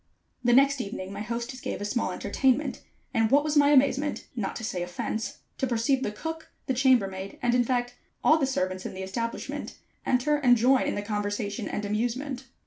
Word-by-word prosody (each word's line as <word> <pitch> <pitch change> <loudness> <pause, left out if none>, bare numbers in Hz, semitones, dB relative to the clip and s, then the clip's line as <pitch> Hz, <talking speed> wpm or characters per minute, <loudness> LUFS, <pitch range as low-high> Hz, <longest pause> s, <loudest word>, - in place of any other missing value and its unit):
The 240 - +3
next 275 +2 +5
evening, 195 -2 -6
my 200 - -5
hostess 235 +3 -4
gave - - -4
a 205 - -3
small 220 -2 -1
entertainment, 255 +9 0 0.3
and 225 -3 +3
what 285 +3 +5
was 305 0 -1
my 290 -1 +6
amazement, 280 +1 +3
not 210 -5 -3
to 225 - -6
say 190 -5 -2
offense, 180 +5 -3 0.2
to 265 - +1
perceive 250 +3 +1
the 235 - -1
cook, 320 +9 -6 0.2
the 265 - 0
chamber 255 -4 +4
maid, 190 0 -7
and 240 0 +1
in 245 0 +4
fact 245 0 -1 0.3
all 315 +1 +5
the 275 - +2
servants 185 -7 -1
in - - -6
the 190 - -5
establishment, 230 +5 -4 0.3
enter 270 +4 +2
and 250 -4 +5
join 255 +3 +4
in - - -1
the 205 - -3
conversation 205 0 -2
and 210 - -3
amusement. 245 +5 -2
240 Hz, 200 wpm, -27 LUFS, 205-265 Hz, 0.3 s, my